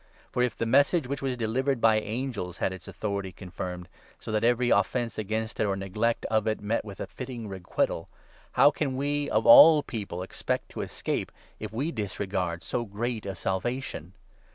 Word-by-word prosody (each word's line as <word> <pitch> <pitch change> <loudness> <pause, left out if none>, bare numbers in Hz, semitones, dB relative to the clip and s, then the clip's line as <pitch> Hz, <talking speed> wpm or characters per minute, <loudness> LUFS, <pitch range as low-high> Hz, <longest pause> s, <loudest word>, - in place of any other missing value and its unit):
For, 125 - 0
if 125 -3 0
the - - -1
Message 140 +7 +4
2 125 - -10
which 140 0 -3
was 130 -2 -1
delivered 125 +4 0
by 110 -1 +5
angels 110 -5 -4
had 95 - 0
its 95 -3 -10
authority 100 -3 -3
confirmed, 90 -1 -6 0.3
so - - -7
that 110 0 0
every 120 +1 +3
offence 120 -3 +1
against 110 +1 -3
it, - - +3
or 100 - 0
neglect 105 +4 -1
of 110 0 +1
it, 110 - 0
met 105 +3 -1
with 100 -2 -9
a - - -3
fitting 125 -4 -7
requital, 95 -3 -2 0.4
how 145 - +6
can 140 -3 -2
we, 145 +1 -1
of - - +1
all 165 - +9
people, 100 -6 -5
expect 95 - -3
to - - -5
escape, - - -3 0.3
if 110 - -5
3 110 - -9
we 150 +6 0
disregard 95 - -3
so 120 +8 -2
great 110 +1 -3
a 95 - -4
Salvation 95 - -3
110 Hz, 190 wpm, -28 LUFS, 100-125 Hz, 0.4 s, all